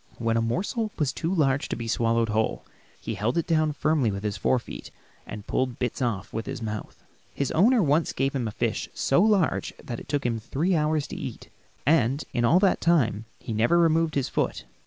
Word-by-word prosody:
When 115 Hz, -1 st, 0 dB
a 115 Hz, -, +2 dB
morsel 200 Hz, -, -1 dB
was 145 Hz, -4 st, 0 dB
too 165 Hz, -, -2 dB
large 145 Hz, -6 st, +1 dB
to -, -, -1 dB
be 115 Hz, 0 st, -5 dB
swallowed 115 Hz, 0 st, +1 dB
whole, 110 Hz, +1 st, -1 dB, 0.3 s
he -, -, -4 dB
held 115 Hz, +8 st, -1 dB
it 170 Hz, -, +1 dB
down 155 Hz, -2 st, +2 dB
firmly 150 Hz, -4 st, +1 dB
with 100 Hz, 0 st, -4 dB
his 105 Hz, -1 st, -2 dB
fore 105 Hz, +6 st, +2 dB
feet 120 Hz, -, -8 dB, 0.4 s
and 105 Hz, -1 st, -8 dB
pulled 130 Hz, -2 st, -1 dB
bits 125 Hz, 0 st, -2 dB
off 110 Hz, -5 st, -2 dB
with 110 Hz, +1 st, -4 dB
his -, -, -4 dB
mouth. 110 Hz, -2 st, -6 dB, 0.3 s
His 140 Hz, -, -1 dB
owner 220 Hz, +6 st, +4 dB
once 150 Hz, +2 st, +2 dB
gave 135 Hz, +1 st, -1 dB
him 125 Hz, -4 st, -1 dB
a -, -, -3 dB
fish -, -, -2 dB
so 135 Hz, -, +2 dB
large 205 Hz, -5 st, +2 dB
that 120 Hz, -2 st, -6 dB
it -, -, -13 dB
took 145 Hz, -2 st, -1 dB
him 115 Hz, -2 st, 0 dB
three 160 Hz, -, 0 dB
hours 150 Hz, -1 st, +1 dB
to -, -, -6 dB
eat -, -, -6 dB
it, -, -, -27 dB, 0.3 s
and 140 Hz, -1 st, +3 dB
in 120 Hz, -, 0 dB
all 165 Hz, +10 st, +5 dB
that 195 Hz, -2 st, +3 dB
time 115 Hz, -11 st, +2 dB
he 115 Hz, -, -6 dB
never 115 Hz, +10 st, +3 dB
removed 165 Hz, -1 st, +3 dB
his 140 Hz, -3 st, +1 dB
foot. -, -, -2 dB
135 Hz, 220 wpm, -26 LUFS, 115-160 Hz, 0.4 s, all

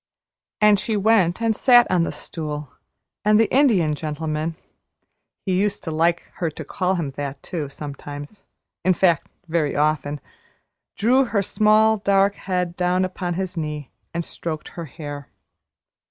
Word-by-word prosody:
And 210 Hz, -1 st, +5 dB
she 215 Hz, +1 st, -1 dB
went 205 Hz, -2 st, +3 dB
and 225 Hz, -1 st, +2 dB
sat 245 Hz, 0 st, +6 dB
on 175 Hz, -2 st, +3 dB
the -, -, -3 dB
stool, 150 Hz, -4 st, -6 dB, 0.5 s
and 210 Hz, 0 st, +5 dB
the 225 Hz, -, +5 dB
Indian 220 Hz, -, +4 dB
Gentleman 155 Hz, +1 st, -3 dB, 0.9 s
(he 190 Hz, -, 0 dB
used 200 Hz, +2 st, 0 dB
to 160 Hz, -, -4 dB
like 170 Hz, +2 st, +2 dB
her 170 Hz, -3 st, 0 dB
to 155 Hz, 0 st, -8 dB
call 185 Hz, +5 st, 0 dB
him 160 Hz, -6 st, -2 dB
that, 140 Hz, 0 st, -6 dB
too, 155 Hz, -5 st, -4 dB
sometimes, 145 Hz, +5 st, -8 dB, 0.4 s
in 185 Hz, +1 st, +3 dB
fact 170 Hz, -4 st, +2 dB, 0.2 s
very 160 Hz, -3 st, 0 dB
often) 150 Hz, -1 st, 0 dB, 0.8 s
drew 255 Hz, +6 st, +4 dB
her 205 Hz, -4 st, 0 dB
small, 215 Hz, +2 st, +4 dB
dark 200 Hz, 0 st, +3 dB
head 180 Hz, -3 st, -2 dB
down 180 Hz, +1 st, +1 dB
upon 180 Hz, -1 st, -3 dB
his 185 Hz, 0 st, -3 dB
knee 150 Hz, -3 st, -4 dB, 0.2 s
and 170 Hz, 0 st, -3 dB
stroked 155 Hz, -2 st, -5 dB
her 170 Hz, -, -7 dB
hair. 145 Hz, -2 st, -8 dB
175 Hz, 150 wpm, -22 LUFS, 150-200 Hz, 0.9 s, sat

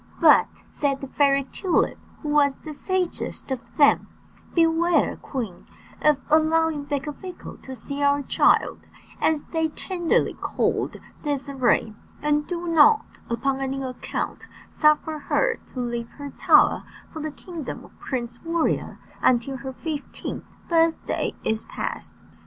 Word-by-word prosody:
"But," -, -, +5 dB
said 280 Hz, -2 st, -1 dB
the 275 Hz, -, -6 dB
Fairy 275 Hz, 0 st, +3 dB
Tulip, 350 Hz, +7 st, 0 dB, 0.2 s
who 300 Hz, -, -3 dB
was 285 Hz, -2 st, +3 dB
the 310 Hz, -, -8 dB
sagest 365 Hz, -3 st, -2 dB
of 260 Hz, -, 0 dB, 0.2 s
them, 285 Hz, -2 st, +5 dB, 0.5 s
"beware, 335 Hz, +1 st, +3 dB
queen, 230 Hz, -10 st, -5 dB, 0.4 s
of 300 Hz, -2 st, +5 dB
allowing 315 Hz, -1 st, +3 dB
Becafico 295 Hz, +6 st, -5 dB
to 265 Hz, -, -8 dB
see 280 Hz, +4 st, -6 dB
our 285 Hz, 0 st, +3 dB
child," -, -, +2 dB, 0.3 s
as 310 Hz, -2 st, +2 dB
they 320 Hz, -1 st, +1 dB
tenderly 345 Hz, +1 st, 0 dB
called -, -, -1 dB, 0.3 s
Désirée, 270 Hz, -6 st, +1 dB, 0.3 s
"and 295 Hz, 0 st, +1 dB
do 350 Hz, -1 st, -3 dB
not 335 Hz, +7 st, +4 dB
upon 265 Hz, +3 st, 0 dB
any 270 Hz, 0 st, -2 dB
account 255 Hz, -1 st, -4 dB, 0.2 s
suffer 305 Hz, 0 st, +2 dB
her 480 Hz, +10 st, +1 dB, 0.2 s
to -, -, -3 dB
leave 235 Hz, -1 st, -3 dB
her 285 Hz, -1 st, -6 dB
tower -, -, +4 dB, 0.3 s
for 315 Hz, -, -5 dB
the 310 Hz, -, -2 dB
kingdom 325 Hz, 0 st, -7 dB
of -, -, -20 dB
Prince 235 Hz, -2 st, -4 dB
Warrior 335 Hz, 0 st, 0 dB, 0.2 s
until 255 Hz, +2 st, +2 dB
her 265 Hz, +1 st, -6 dB
fifteenth 295 Hz, +2 st, -5 dB, 0.2 s
birthday 330 Hz, -1 st, +1 dB
is 220 Hz, 0 st, -1 dB
past." -, -, -5 dB
290 Hz, 130 wpm, -24 LUFS, 270-325 Hz, 0.5 s, But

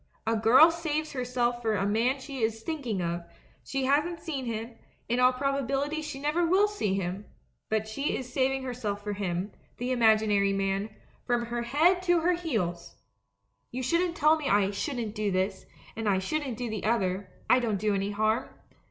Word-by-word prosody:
A 225 Hz, +1 st, +1 dB
girl 250 Hz, +9 st, +7 dB
saves 310 Hz, -2 st, -2 dB
herself 245 Hz, -2 st, -1 dB
for 220 Hz, -2 st, +1 dB
a 195 Hz, 0 st, 0 dB
man 230 Hz, +6 st, +1 dB
she 270 Hz, 0 st, -7 dB
is 225 Hz, 0 st, -1 dB
thinking 245 Hz, -, -2 dB
of; 170 Hz, 0 st, -2 dB, 0.4 s
she 270 Hz, -1 st, -2 dB
hasn't 300 Hz, +5 st, +1 dB
seen 280 Hz, -6 st, -4 dB
him 230 Hz, 0 st, -4 dB, 0.2 s
— -, -, -38 dB
in 240 Hz, +1 st, 0 dB
all 250 Hz, 0 st, +6 dB
probability 275 Hz, +3 st, -1 dB
she 300 Hz, -2 st, -6 dB
never 300 Hz, +5 st, +1 dB
will 375 Hz, +5 st, +4 dB
see 390 Hz, -, -1 dB
him; 190 Hz, +1 st, -3 dB, 0.4 s
but 220 Hz, 0 st, 0 dB
she 275 Hz, +7 st, -2 dB
is 250 Hz, -1 st, -8 dB
saving 270 Hz, 0 st, +1 dB
herself 225 Hz, -5 st, -4 dB
for 210 Hz, 0 st, -3 dB
him 190 Hz, 0 st, -2 dB
— -, -, -36 dB
the 245 Hz, +1 st, -2 dB
imaginary 215 Hz, -4 st, +3 dB
man 195 Hz, +1 st, -1 dB, 0.2 s
— -, -, -33 dB
from 240 Hz, -1 st, +1 dB
her 240 Hz, 0 st, -3 dB
head 315 Hz, +10 st, +3 dB
to 350 Hz, -2 st, +3 dB
her 355 Hz, +2 st, +3 dB
heels!... 215 Hz, -, -3 dB, 0.7 s
You 255 Hz, +1 st, -4 dB
tell 330 Hz, +1 st, +3 dB
me 300 Hz, -3 st, -3 dB
I 200 Hz, -1 st, +3 dB
"shouldn't 235 Hz, -1 st, -3 dB
do 210 Hz, -1 st, -1 dB
this," 190 Hz, +1 st, -1 dB, 0.3 s
and 225 Hz, -2 st, -1 dB
I 195 Hz, -, +3 dB
"shouldn't 265 Hz, +5 st, -2 dB
do 245 Hz, -, -3 dB
the 215 Hz, -2 st, -4 dB
other" 195 Hz, -4 st, 0 dB
— -, -, -30 dB
I 255 Hz, -, +5 dB
don't 225 Hz, -4 st, 0 dB
do 210 Hz, +1 st, 0 dB
any 195 Hz, 0 st, -1 dB
harm. 215 Hz, +3 st, 0 dB
240 Hz, 195 wpm, -28 LUFS, 205-280 Hz, 0.7 s, girl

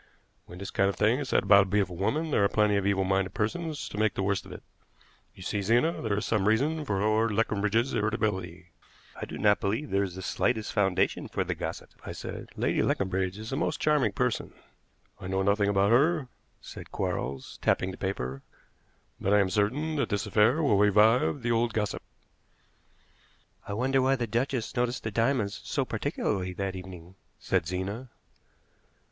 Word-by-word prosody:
When 90 Hz, -, -10 dB
this 100 Hz, +1 st, -6 dB
kind 100 Hz, 0 st, +2 dB
of 100 Hz, -, -3 dB
thing 110 Hz, +5 st, +2 dB
is 140 Hz, -4 st, -4 dB
said -, -, +2 dB
about 100 Hz, 0 st, +7 dB
a -, -, +1 dB
beautiful 95 Hz, -2 st, 0 dB
woman 150 Hz, -, -1 dB
there 105 Hz, -, +3 dB
are 100 Hz, -, +3 dB
plenty 105 Hz, -1 st, +2 dB
of 100 Hz, -1 st, +1 dB
evil 100 Hz, -1 st, +2 dB
minded 95 Hz, 0 st, 0 dB
persons 155 Hz, +8 st, -2 dB
to 105 Hz, -, -6 dB
make 110 Hz, -1 st, +2 dB
the 95 Hz, -, -1 dB
worst 100 Hz, 0 st, -1 dB
of -, -, -11 dB
it. -, -, -9 dB, 0.7 s
You 95 Hz, -, -11 dB
see, 100 Hz, +3 st, -2 dB
Zena, 120 Hz, -, +2 dB
there 105 Hz, -3 st, -1 dB
is 105 Hz, -, -2 dB
some 105 Hz, -3 st, +1 dB
reason 145 Hz, +9 st, +2 dB
for 100 Hz, -6 st, -1 dB
Lord 110 Hz, +2 st, +2 dB
Leconbridge's 110 Hz, +3 st, +1 dB
irritability." 95 Hz, -5 st, -2 dB, 0.4 s
"I -, -, -5 dB
do -, -, -7 dB
not 105 Hz, -1 st, +3 dB
believe 110 Hz, +9 st, -2 dB
there 100 Hz, -, +2 dB
was 95 Hz, -3 st, -3 dB
the 95 Hz, -, -7 dB
slightest 110 Hz, +2 st, -1 dB
foundation 95 Hz, -4 st, +1 dB
for -, -, -2 dB
the -, -, -2 dB
gossip," -, -, -6 dB
I -, -, -6 dB
said. -, -, -7 dB
"Lady -, -, +1 dB
Leconbridge 95 Hz, 0 st, 0 dB
is 110 Hz, +3 st, -7 dB
a -, -, -1 dB
most -, -, -1 dB
charming 150 Hz, -8 st, +2 dB
person." 125 Hz, +1 st, -1 dB, 0.7 s
"I 90 Hz, -, -7 dB
know 95 Hz, +1 st, 0 dB
nothing 100 Hz, +1 st, +2 dB
about 100 Hz, +1 st, +3 dB
her," 140 Hz, +2 st, +3 dB, 0.3 s
said -, -, -10 dB
Quarles, 65 Hz, 0 st, -4 dB
tapping 95 Hz, -, +1 dB
the -, -, -8 dB
paper; 70 Hz, -9 st, -3 dB, 0.8 s
"but 100 Hz, -, +1 dB
I -, -, +5 dB
am 95 Hz, -2 st, +1 dB
certain 135 Hz, -, 0 dB
that 140 Hz, -, 0 dB
this 100 Hz, -1 st, -1 dB
affair 110 Hz, +9 st, +3 dB
will 105 Hz, -9 st, +3 dB
revive 110 Hz, +6 st, +4 dB
the 120 Hz, -, 0 dB
old 115 Hz, 0 st, +1 dB
gossip." 105 Hz, -2 st, -1 dB, 1.7 s
"I 100 Hz, -, -4 dB
wonder 130 Hz, +5 st, +1 dB
why 135 Hz, +1 st, +3 dB
the 120 Hz, -2 st, -2 dB
duchess 120 Hz, +2 st, -2 dB
noticed 125 Hz, 0 st, -1 dB
the 110 Hz, -, -3 dB
diamonds 115 Hz, -2 st, 0 dB
so -, -, -1 dB
particularly 90 Hz, -1 st, -2 dB
that 95 Hz, +1 st, -3 dB
evening," 90 Hz, 0 st, -10 dB, 0.2 s
said 90 Hz, -4 st, 0 dB
Zena. 100 Hz, +8 st, -4 dB
105 Hz, 190 wpm, -28 LUFS, 95-120 Hz, 1.7 s, about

